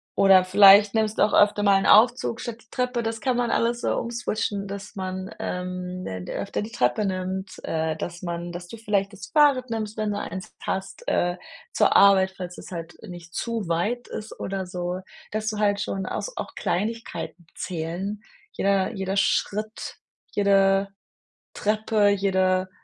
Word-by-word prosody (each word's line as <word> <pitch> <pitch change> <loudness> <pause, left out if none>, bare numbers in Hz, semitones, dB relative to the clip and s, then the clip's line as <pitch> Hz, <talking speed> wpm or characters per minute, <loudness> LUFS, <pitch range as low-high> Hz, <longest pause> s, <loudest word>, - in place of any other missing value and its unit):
oder 195 -2 +6
vielleicht 200 +2 +7
nimmst 220 -1 +1
du - - +4
auch 210 - +2
öfter 205 0 +4
mal 200 -1 +5
'n - - -2
Aufzug 230 +1 +4
statt 235 -3 -5
die 220 - -26
Treppe. 250 -1 -1
Das 225 0 -3
kann 255 -2 +1
man 240 -1 +1
alles 235 +1 +1
so - - 0
umswitchen, 215 -4 -2
dass 200 +1 -8
man, 185 0 -5
ähm, 180 0 -4
d 95 -1 -6
öfter 200 - -3
die 215 - -6
Treppe 125 +12 +1
nimmt, 190 0 -3
äh, 160 0 -1
dass 175 +2 -6
man 175 0 -4
dass 175 0 -7
du 230 - -9
vielleicht 205 -2 -1
das 200 - -9
Fahrrad 285 -5 +4
nimmst, 220 -1 -3
wenn 215 -1 -1
du 205 - -2
eins 185 -1 -7
hast, 190 0 -4
äh, 175 +1 +1 0.4
zur - - +3
Arbeit, 190 -1 +6
falls 180 -1 -6
das - - -10
halt 170 -1 -7
nicht 175 -1 -10
zu 230 -4 -3
weit 210 +9 -1
ist, 215 - -7
oder 195 -1 -3
so, 180 0 -3 0.3
dass 215 0 -3
du 215 - -4
halt 205 -1 +2
schon 195 -2 -3
aus - - -4
auch - - -5
Kleinigkeiten 185 -4 -3
zählen. 180 +4 -4 0.3
Jeder 195 0 +1
jeder 195 -1 -3
Schritt, 215 +2 -1 0.4
jede 195 -1 +3 0.7
Treppe, 210 0 +2
jede 190 -2 +1
195 Hz, 170 wpm, -25 LUFS, 185-215 Hz, 0.7 s, vielleicht